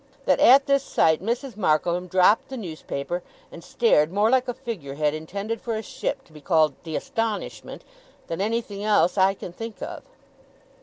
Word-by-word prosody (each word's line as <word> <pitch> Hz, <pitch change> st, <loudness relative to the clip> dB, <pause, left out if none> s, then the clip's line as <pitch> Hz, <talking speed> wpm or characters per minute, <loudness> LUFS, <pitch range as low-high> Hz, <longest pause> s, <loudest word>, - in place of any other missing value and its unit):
That -, -, +3 dB
at 270 Hz, +3 st, +7 dB
this 275 Hz, -1 st, +3 dB
sight 160 Hz, -, +2 dB
Mrs. 240 Hz, +3 st, -3 dB
Markleham 175 Hz, -1 st, +1 dB
dropped 185 Hz, +4 st, +3 dB
the 265 Hz, -, -6 dB
newspaper, 170 Hz, -, -5 dB, 0.3 s
and 170 Hz, -, -11 dB
stared 165 Hz, -8 st, +2 dB
more 205 Hz, +4 st, +2 dB
like 260 Hz, 0 st, +3 dB
a 245 Hz, -, -2 dB
figure 185 Hz, -, -6 dB
head 150 Hz, 0 st, +1 dB
intended 200 Hz, +8 st, -5 dB
for 230 Hz, -2 st, -3 dB
a 220 Hz, -, -4 dB
ship -, -, -4 dB
to 160 Hz, -, -23 dB
be 150 Hz, -, -13 dB
called 155 Hz, -3 st, +3 dB
The 160 Hz, -2 st, -4 dB
Astonishment, 225 Hz, -2 st, -4 dB, 0.4 s
than 165 Hz, +3 st, -4 dB
anything 210 Hz, -1 st, -2 dB
else 210 Hz, -4 st, +3 dB
I 195 Hz, 0 st, +3 dB
can 175 Hz, -, -9 dB
think 225 Hz, +3 st, -8 dB
of. -, -, -6 dB
200 Hz, 175 wpm, -24 LUFS, 165-230 Hz, 0.4 s, at